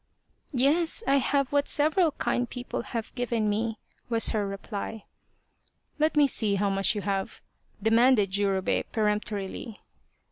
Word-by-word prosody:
Yes, 320 - +2
I 275 - +3
have 275 0 0
what 285 0 +1
several 310 +2 +2
kind 240 0 -1
people 245 0 -5
have 230 -2 -6
given 235 -3 -1
me," 225 +1 -2 0.3
was 230 -1 +3
her 210 -2 -1
reply. 200 +2 -6 0.5
" - - -40
Let 310 0 +1
me 295 - +6
see 220 -6 +2
how 200 0 0
much 195 +3 +2
you 205 - -2
have? 195 -1 -3 0.2
" - - -24
demanded 225 -2 +4
Jurobei 195 -1 +1
peremptorily. 210 0 -2
225 Hz, 145 wpm, -27 LUFS, 205-265 Hz, 0.5 s, me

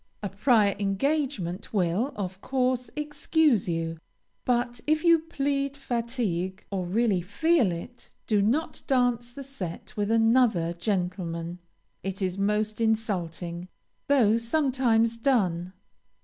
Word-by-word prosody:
A 200 - -1
prior 205 -1 +3
engagement 205 - -1
will, 195 +8 +1
of 190 -1 -5
course, 255 -2 0
excuse 300 - +1
you, 165 -1 -2 0.5
but 240 -1 0
if 310 +1 +2
you 335 -1 +6
plead 280 -3 -2
fatigue, 230 -8 -2
or 185 -3 -2
really 205 -1 +2
feel 245 - +2
it, 175 +9 -8 0.2
do 210 -2 +2
not 255 +11 0
dance 245 -3 +1
the 275 +3 -8
set 245 -5 -7
with 205 -1 -1
another 225 -6 +3
gentleman; 175 -2 -3 0.4
it 195 0 -4
is 190 -1 -2
most 210 +2 0
insulting, 180 -6 -1 0.4
though 230 -6 +4
sometimes 235 -3 +2
done. 185 -9 +1
225 Hz, 120 wpm, -27 LUFS, 185-260 Hz, 0.5 s, you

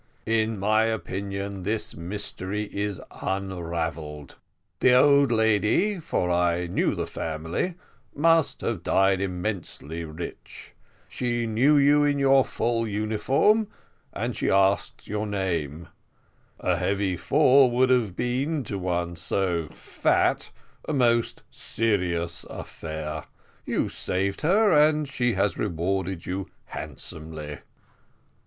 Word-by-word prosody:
In 110 -1 +1
my 110 +3 +3
opinion, 100 -2 -3
this 105 +4 -2
mystery 100 +2 -4
is 100 -1 -2 0.2
unravelled. 85 -6 -4 0.4
The 125 - +5
old 140 0 +5
lady, 110 - +2
for 120 - -1
I 90 0 +1
knew 85 - 0
the - - -2
family, 80 - -3 0.4
must 165 +1 +3
have 110 -7 -2
died 95 +2 +2
immensely 90 -4 -4
rich: 80 +2 -9 0.3
she 120 -1 -2
knew 125 +7 +3
you 145 +1 +5
in 145 -1 +2
your 135 -1 +5
full 115 -1 -1
uniform, 110 - +2 0.4
and - - -3
she - - -1
asked 95 +1 +2
your 105 +1 -2
name; 85 -6 -2 0.7
a - - +1
heavy 100 -2 0
fall 135 - +5
would 130 +2 +3
have 115 -8 +2
been 135 +5 -1
to 100 -3 -4
one 85 -1 -2
so 85 -1 0
fat - - 0 0.4
a - - -1
most 120 -4 +1
serious 90 -6 -1
affair; 80 -1 -6 0.4
you - - 0
saved 95 +2 -2
her, 200 +7 +4
and 150 -1 +4
she 125 -3 0
has 95 -2 0
rewarded 95 -1 -2
you 95 +1 -4 0.2
handsomely." 75 -1 -7
100 Hz, 115 wpm, -26 LUFS, 90-125 Hz, 0.7 s, The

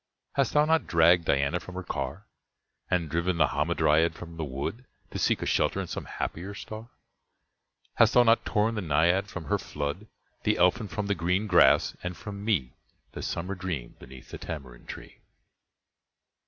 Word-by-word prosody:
Hast 140 -1 +1
thou 150 0 +5
not 160 +1 +2
dragged 85 0 +5
Diana 70 +5 +1
from 90 - -11
her 95 - -4
car? 75 +7 -4 0.6
And 90 -3 +1
driven 85 +3 0
the - - +4
Hamadryad 80 +2 +2
from 85 0 -9
the 80 - -4
wood 70 - -4 0.3
To - - -4
seek - - +1
a - - -2
shelter - - +1
in - - -2
some - - -6
happier 95 +5 -5
star? 110 +3 -8 1.1
Hast - - +5
thous 125 0 +7
not 115 0 +4
torn 110 +1 +1
the 105 - -2
Naiad 85 +4 +2
from 95 -4 -7
her - - 0
flood, 75 +8 -4 0.3
The 105 0 +1
Elfin 90 +5 +3
from 105 +1 -3
the 100 - +1
green 90 +3 0
grass, 105 - +5
and 90 -1 -5
from 100 -1 -7
me 90 - 0 0.4
The - - -7
summer 90 +4 -3
dream 90 -10 -5
beneath 65 0 -13
the - - -7
tamarind 65 -6 -8
tree? - - -9
90 Hz, 175 wpm, -28 LUFS, 80-105 Hz, 1.1 s, thous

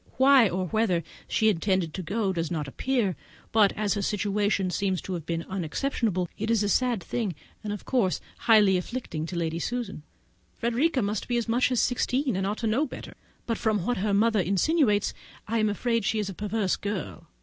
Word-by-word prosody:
Why, 265 -4 +6
or 185 +1 -1
whither 190 -5 +1 0.2
she 220 - +2
intended 185 -4 +1
to 190 - -4
go, 195 +3 -1
does 165 -2 -2
not 155 -4 -2
appear; 225 - 0 0.4
but, 210 -3 +5
as 210 -2 0
her 205 - -2
situation 205 -1 0
seems 190 -1 0
to 190 - -4
have 165 -3 -5
been 165 0 -2
unexceptionable, 190 - -1
it 220 +2 -2
is 225 -2 +3
a 205 - 0
sad 240 -3 +1
thing, 210 -5 -2 0.3
and 210 - -3
of 205 - -6
course 230 -9 +1 0.2
highly 215 -4 +5
distressing 170 -9 -5
to 180 - -6
Lady 165 -1 -1
Susan. 235 -3 -3 0.5
Frederica 250 +3 +1
must 205 0 -2
be 240 - 0
as 235 - -1
much 245 +3 +2
as 250 - +2
sixteen, 255 0 +1
and 190 +1 0
ought 210 +2 -2
to 230 - -3
know 245 +8 +2
better; - - -9 0.3
but 230 -2 -2
from 210 -5 0
what 245 +1 0
her 205 +2 0
mother 215 +2 +3
insinuates, 205 - +2 0.3
I 230 +1 0
am 215 -1 +2
afraid 230 +2 0
she 220 - 0
is 210 -2 -1
a - - -5
perverse 210 0 -1
girl. 205 -4 -5
210 Hz, 200 wpm, -27 LUFS, 185-230 Hz, 0.5 s, Why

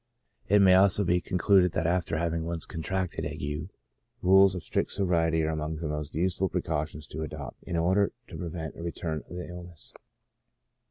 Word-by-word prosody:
It 100 0 +6
may 95 -1 +7
also 95 +1 +5
be 90 -1 +2
concluded 90 +1 +3
that 80 - 0
after 85 -1 +1
having 85 0 -1
once 85 0 -2
con 80 - -6
tracted 95 +1 -2
ague, 75 +4 -4 0.5
rules 95 +1 +6
of 90 - -5
strict - - -1
sobriety 80 -4 +2
are 80 - 0
among 75 0 -3
the 80 0 -4
most 75 -1 -4
useful 90 +3 +1
precautions 80 -3 -2
to 75 +1 -7
adopt 75 -4 -7
in 85 - -2
order 95 +4 +3 0.2
to - - -9
prevent 80 -3 -5
a - - -9
return 85 -2 -3
of - - -8
the 90 - -5
illness. 90 -2 -7
85 Hz, 180 wpm, -28 LUFS, 80-90 Hz, 0.5 s, may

